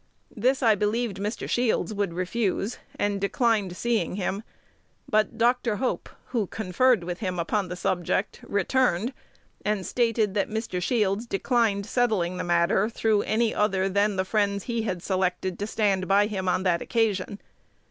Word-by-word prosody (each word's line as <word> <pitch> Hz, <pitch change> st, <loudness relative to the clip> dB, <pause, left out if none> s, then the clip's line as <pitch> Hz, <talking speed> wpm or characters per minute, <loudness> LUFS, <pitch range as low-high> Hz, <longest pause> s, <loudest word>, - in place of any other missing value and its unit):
This 255 Hz, +5 st, +1 dB
I 225 Hz, -2 st, +6 dB
believed 210 Hz, +1 st, -1 dB
Mr. 210 Hz, +4 st, -3 dB
Shields 240 Hz, -2 st, +1 dB
would 200 Hz, -4 st, -1 dB
refuse, 195 Hz, +3 st, -1 dB, 0.2 s
and 205 Hz, -1 st, 0 dB
declined 200 Hz, -3 st, +1 dB
seeing 235 Hz, -4 st, 0 dB
him; 195 Hz, +1 st, -2 dB, 0.7 s
but 215 Hz, +1 st, +1 dB
Dr. 235 Hz, -1 st, +2 dB
Hope, 255 Hz, +4 st, -2 dB, 0.2 s
who 225 Hz, -6 st, 0 dB
conferred 220 Hz, +2 st, +2 dB
with 175 Hz, +1 st, -4 dB
him 185 Hz, -4 st, -2 dB
upon 190 Hz, +3 st, 0 dB
the 180 Hz, -, -5 dB
subject, 180 Hz, +2 st, -1 dB
returned, 225 Hz, +2 st, +1 dB, 0.5 s
and 210 Hz, -3 st, -1 dB
stated 230 Hz, -4 st, +1 dB
that 200 Hz, -1 st, 0 dB
Mr. 220 Hz, -4 st, -3 dB
Shields 210 Hz, +1 st, 0 dB
declined 215 Hz, -2 st, +1 dB
settling 210 Hz, -7 st, 0 dB
the -, -, -2 dB
matter 175 Hz, +5 st, +2 dB
through 220 Hz, -2 st, +1 dB
any 225 Hz, +1 st, +1 dB
other 195 Hz, -2 st, +1 dB
than 200 Hz, +1 st, +1 dB
the 185 Hz, 0 st, 0 dB
friends 200 Hz, -1 st, 0 dB
he 235 Hz, -2 st, -2 dB
had 185 Hz, -5 st, -3 dB
selected 185 Hz, -1 st, -1 dB
to 205 Hz, -, -2 dB
stand 200 Hz, -4 st, +1 dB
by 200 Hz, +2 st, +4 dB
him 190 Hz, -3 st, -2 dB
on 180 Hz, -, +1 dB
that 175 Hz, -3 st, +2 dB
occasion. 205 Hz, -3 st, 0 dB
205 Hz, 160 wpm, -26 LUFS, 190-225 Hz, 0.7 s, I